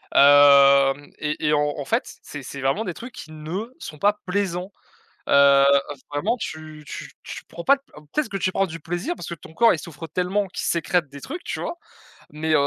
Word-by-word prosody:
hem, 140 0 +6
et 150 0 -3
et 150 - +3
en 150 - +3 0.2
en 145 - -4
fait, - - 0 0.2
c'est 145 - -8
c'est 135 +1 -8
vraiment 135 +11 0
des 180 - -4
trucs 240 +1 -9
qui 155 - -10
ne 160 +8 -5
sont 155 - -9
pas 205 +5 +2
plaisants, 185 0 -2 0.6
heu, 140 0 +6 0.5
vraiment 190 +12 0
tu 155 -5 -7
tu - - -7
tu - - -8
prends 170 - -8
pas 275 - +6
d 275 - -17 0.3
peut-être 300 -7 0
que 195 - -3
tu 185 0 0
prends 195 - +1
du 165 -2 -8
plaisir 175 - -3
parce - - -8
que 170 - -5
ton 160 - -15
corps 230 +6 +5
il - - -2
souffre 165 0 -9
tellement 185 +5 -1
qu'il 185 - -5
sécrète 170 -1 +1
des 140 0 -11
trucs, 335 +6 -7
tu - - -4
vois - - -4 0.6
mais 155 +1 -1
160 Hz, 210 wpm, -23 LUFS, 145-195 Hz, 0.6 s, hem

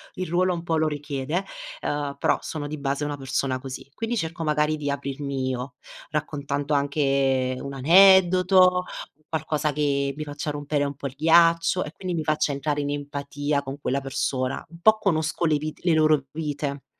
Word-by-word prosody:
il 185 0 -3
ruolo 180 +2 +2
un 170 - -6
po' 165 -1 0
lo 155 0 +2
richiede. 145 +4 -3 0.4
Uhm, 145 -1 -2
però, - - +2
sono 150 -2 -5
di 150 +1 -5
base 140 +1 -1
una 145 0 -3
persona 135 -1 -2
così. 135 +1 -8
Quindi 230 +1 -2
cerco 165 -3 -3
magari 150 0 +1
di 145 -1 -3
aprirmi 140 -1 -3
io, 125 0 -4 0.3
raccontando 145 -1 -2
anche 135 -2 +1
un 140 - -6
aneddoto, 185 +3 +6 0.4
qualcosa 155 -1 -1
che 140 -1 0
mi 155 - -3
faccia 145 0 -5
rompere 145 0 -1
un 140 -1 -4
po' 140 - -10
il 135 - -3
ghiaccio, 165 +3 +4
e 150 - -7
quindi 180 +2 -4
mi 160 - -1
faccia 155 0 +1
entrare 145 +1 -1
in 145 - -2
empatia 145 0 -2
con 135 +1 -7
quella 140 -1 -1
persona. 130 -1 -2
Un 170 - -14
po' 220 +2 +6
conosco 165 -4 0
le 155 -2 +3
vite 155 +1 -6
le 170 - +4
loro 155 -3 +4
vite. 145 -2 -4
145 Hz, 180 wpm, -25 LUFS, 140-160 Hz, 0.4 s, aneddoto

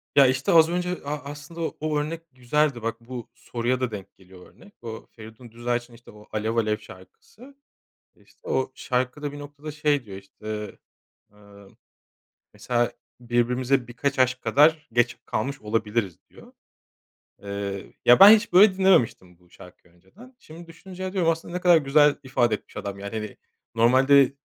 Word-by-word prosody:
Ya, 140 -2 +7
işte 135 +2 0
az 160 -1 +6
önce 180 +1 -2
a 145 - -4 0.2
aslında 150 +3 -10
o 165 - -4
o 155 0 -1
örnek 160 +3 -4
güzeldi. 130 +1 0
Bak, 115 +1 -3
bu 120 -1 -8
soruya 120 +2 -2
da 125 -2 -1
denk 100 -3 -9
geliyor 95 -1 -17
örnek. 205 - -19
O 115 -1 -8
Feridun 110 +1 -13
Düzağaç'ın, 120 +1 -3
işte, 115 +1 -16
o 105 0 -17
Alev 110 +1 -2
Alev 110 -2 +1
şarkısı. 210 - -16 0.6
İşte - - -26
o 130 0 -1
şarkıda 130 +4 -2
bir 145 - -9
noktada, 145 +1 -9
şey, 150 -3 0
diyor, 95 -2 -9
işte. 105 +1 -8 0.5
Iıı, 100 -1 -18 0.8
mesela 120 -1 -1 0.3
birbirimize 125 +1 0
birkaç 135 +3 -3
aşk 130 0 +2
kadar 155 +1 +3
geç 120 0 +1
kalmış 135 +5 -3
olabiliriz, 105 -3 -2
diyor. - - -17 0.9
Eee, 100 -1 -6
ya 120 - +7
ben 195 - +11
hiç 220 -3 -3
böyle 190 +1 +6
dinlememiştim 120 - +2
bu 90 -1 -27
şarkıyı 90 -1 -17
önceden. 200 - -18
Şimdi 165 +2 -13
düşününce 185 +2 -8
diyorum, 180 -4 +1
aslında 165 +1 -6
ne 180 - -3
kadar 175 -2 +6
güzel 145 0 +4
ifade 120 -4 +1
etmiş - - -14
adam, 100 -1 -6
yani. 100 +2 -7
Hani, 105 -2 -6 0.4
normalde 130 +4 +5
125 Hz, 160 wpm, -24 LUFS, 110-150 Hz, 0.9 s, ben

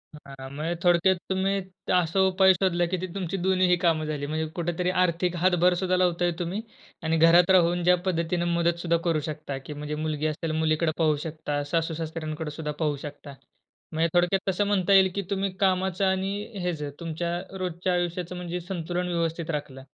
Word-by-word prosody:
हां, 135 -2 -10
म्हणजे 160 +4 -2
थोडक्यात 175 +2 +4
तुम्ही 190 +1 +1 0.4
असा 180 +1 +2
उपाय 190 0 +5
शोधला 175 -1 +1
की 180 +2 -2 0.2
तुमची 195 -1 -3
दोन्हीही 185 0 +3
कामं 160 -2 +2
झाली. 150 -2 -3
म्हणजे 155 +2 -2
कुठेतरी 175 +1 -1
आर्थिक 175 0 0
हातभार 180 -1 +4
सुद्धा 185 -1 +1
लावताय 175 -1 +2
तुम्ही 180 +5 -2 0.4
आणि 160 +1 +1
घरात 170 +2 +6
राहून 175 -1 +4
ज्या 180 +1 +5
पद्धतीने 170 0 0
मदत 170 0 +1
सुद्धा 170 -1 +1
करू 165 -2 +2
शकता, 145 -2 -5
की 135 +3 -8
म्हणजे 150 +1 -5
मुलगी 155 0 -2
असेल 155 +1 -3
मुलीकडे 155 0 +1
पाहू 155 -2 +3
शकता 150 -2 -3
सासू-सासऱ्यांकडे 160 -2 -3
सुद्धा 150 0 -4
पाहू 150 -1 +1
शकता. 145 -1 -9 0.6
म्हणजे 165 +1 +1
थोडक्यात 180 +2 +2
तसं 200 +2 +1
म्हणता 200 -1 +2
येईल 190 -1 +6
की 200 - 0
तुम्ही 195 -1 -1
कामाचं 190 0 +1
आणि 190 +1 0 0.3
हेच 170 -4 -2 0.2
तुमच्या 170 +1 -3 0.2
रोजच्या 180 0 -2
आयुष्याचं 175 0 -2
म्हणजे 180 0 -4
संतुलन 175 0 -3
व्यवस्थित 165 -1 -2
राखलं. 135 -3 -5
170 Hz, 170 wpm, -26 LUFS, 160-180 Hz, 0.6 s, घरात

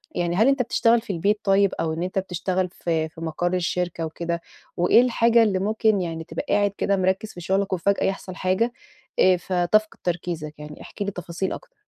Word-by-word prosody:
يعني، 175 0 0
هل 220 +6 +4
أنت 275 -1 +3
بتشتغل 230 -1 +3
في 210 -4 -5
البيت 205 +5 +1
طيب، 195 -1 +3
أو 160 -1 0
إن 165 +2 -3
أنت 185 +1 -1
بتشتغل 185 0 -2
في 160 -3 -2
في 160 - -13
مقر 175 +2 -2
الشركة 175 -2 -1
وكده؟ 170 +1 -3 0.4
وإيه 180 +7 +5
الحاجة 235 -1 +4
اللي 195 -4 +1
ممكن 215 0 +1
يعني، 165 -2 -4
تبقى - - -5
قاعد 205 -1 +3
كده 200 -1 +1
مركِّز 190 +3 0
في 175 - -9
شغلك 190 +2 0
وفجأة 195 +3 +1
يحصل 190 -1 -3
حاجة، 195 +7 0 0.5
آآ، 185 -1 +5
فتفقد 185 +5 +1
تركيزك؟ 170 -3 -3
يعني، 150 0 -9
احكِ - - -12
لي 200 - -1
تفاصيل 180 +1 -4
أكتر. - - -11
185 Hz, 190 wpm, -24 LUFS, 170-205 Hz, 0.5 s, وإيه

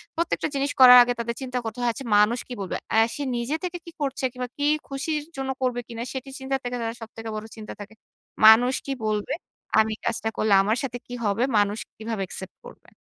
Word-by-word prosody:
প্রত্যেকটা 335 0 0
জিনিস 280 +1 0
করার 250 -1 +11
আগে 245 0 0
তাদের 235 0 -2
চিন্তা 255 -1 -3
করতে 225 0 -5
হয়, 240 - +2
"আচ্ছা, 270 - -8
মানুষ 215 +4 +4
কি 250 - -6
বলবে?" 190 - -3
অ্যা 220 - +4 0.2
সে 290 - -3
নিজে 235 +6 -1
থেকে 360 -1 -3
কি 335 - -9
করছে, 275 -1 -2
কিংবা 250 0 -5
কি 290 - 0 0.2
খুশির 295 +2 -2
জন্য 265 0 -3
করবে 250 -1 0
কিনা, 230 -1 -5
সেটি 265 0 -6
চিন্তার 270 0 -2
থেকে 245 0 -3
তারা 230 0 -3
সবথেকে 225 0 -8
বড় 215 0 -5
চিন্তা 215 -1 -8
থাকে, 205 +1 -9 0.5
"মানুষ 235 +4 +8
কি 275 - -2
বলবে? 210 -1 -1 0.5
আমি 220 0 +3
কাজটা 225 -1 -1
করলে 215 -1 +2
আমার 215 +4 +1
সাথে 245 -2 -3
কি 245 - -8
হবে? 205 +3 +1
মানুষ 205 +1 +2 0.2
কিভাবে 220 -1 -4
একসেপ্ট 190 +1 -8
করবে?" - - -14
240 Hz, 210 wpm, -25 LUFS, 220-270 Hz, 0.5 s, করার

